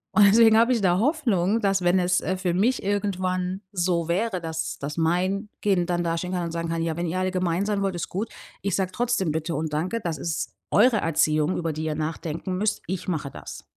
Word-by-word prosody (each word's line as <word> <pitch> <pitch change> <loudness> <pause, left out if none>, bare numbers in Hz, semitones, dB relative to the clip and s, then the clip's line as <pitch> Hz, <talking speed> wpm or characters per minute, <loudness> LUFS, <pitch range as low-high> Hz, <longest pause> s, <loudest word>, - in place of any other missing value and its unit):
Und 210 - +7
deswegen 220 +1 +6
habe 235 +2 +4
ich 235 - +1
da 180 -2 +3
Hoffnung, 225 - +1
dass, 195 -3 +1
wenn 175 +1 +3
es, 180 0 +2
äh, 185 - -1
für 185 -2 -1
mich 230 +9 +1
irgendwann 190 -2 -1
so 175 -3 0
wäre, 185 +2 0
dass 160 -1 -4
dass 145 +1 -5
mein 185 +5 0
Kind 190 -4 +2
dann 175 0 0
dastehen 170 +2 -2
kann 180 -1 -1
und 165 - -4
sagen 170 0 -3
kann:„Ja, 165 -1 -1
wenn 175 0 -1
ihr 170 +3 -2
alle 185 0 0
gemein 185 0 0
sein 205 -1 0
wollt, 195 -2 -1
ist 175 - -4
gut. 205 +5 -3 0.3
Ich 200 -2 0
sage 185 -1 -1
trotzdem 235 -7 0
Bitte 160 +2 -2
und 155 0 -3
Danke. 180 +10 -1
Das 165 -4 -3
ist 165 +2 -3 0.2
eure 230 +2 +5
Erziehung, 155 -1 +1
über 165 -2 -2
die 155 +1 -4
ihr 155 -1 -1
nachdenken 160 +3 -3
müsst. 210 +1 0
Ich 185 0 -4
mache 155 -6 -2
das.“ - - -9
180 Hz, 220 wpm, -25 LUFS, 165-200 Hz, 0.3 s, Und